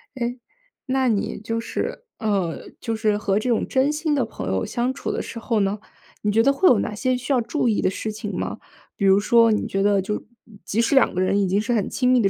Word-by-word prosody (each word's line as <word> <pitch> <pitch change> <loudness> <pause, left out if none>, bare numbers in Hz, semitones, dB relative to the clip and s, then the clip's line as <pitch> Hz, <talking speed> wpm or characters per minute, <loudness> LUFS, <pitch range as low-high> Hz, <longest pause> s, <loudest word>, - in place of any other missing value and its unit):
诶， 245 0 -3 0.5
那 265 -1 +1
你 210 -3 -1
就 225 +2 -3
是 230 - -4
呃， 195 -7 -1
就 230 -1 -2
是 215 -2 +1
和 200 -1 0
这 245 +3 -2
种 230 - +1
真 265 +2 +2
心 305 0 0
的 275 - +2
朋 220 - -7
友 95 -1 0
相 245 +2 -1
处 - - -4
的 - - -2
时 230 - -7
候 230 -1 0
呢， 200 +1 0 0.4
你 210 - +1
觉 225 - +4
得 275 +4 +4
会 365 +6 +4
有 240 - +5
哪 210 - -3
些 255 +3 0
需 255 +3 -2
要 250 - +3
注 250 +3 -1
意 220 - +2
的 - - +2
事 215 +3 -4
情 210 -1 -6
吗？ - - -3 0.4
比 200 - -1
如 195 +1 +6
说 230 +2 +5
你 215 - 0
觉 195 0 -1
得 200 -1 +3
就 210 +3 -4 0.4
即 215 - -2
使 235 +4 +2
两 270 - +4
个 180 - -2
人 185 +2 +2
已 195 - +1
经 195 +3 +1
是 240 - -1
很 215 -4 0
亲 250 -1 +1
密 255 -1 +5
的 195 - +3
225 Hz, 275 characters per minute, -23 LUFS, 205-250 Hz, 0.5 s, 如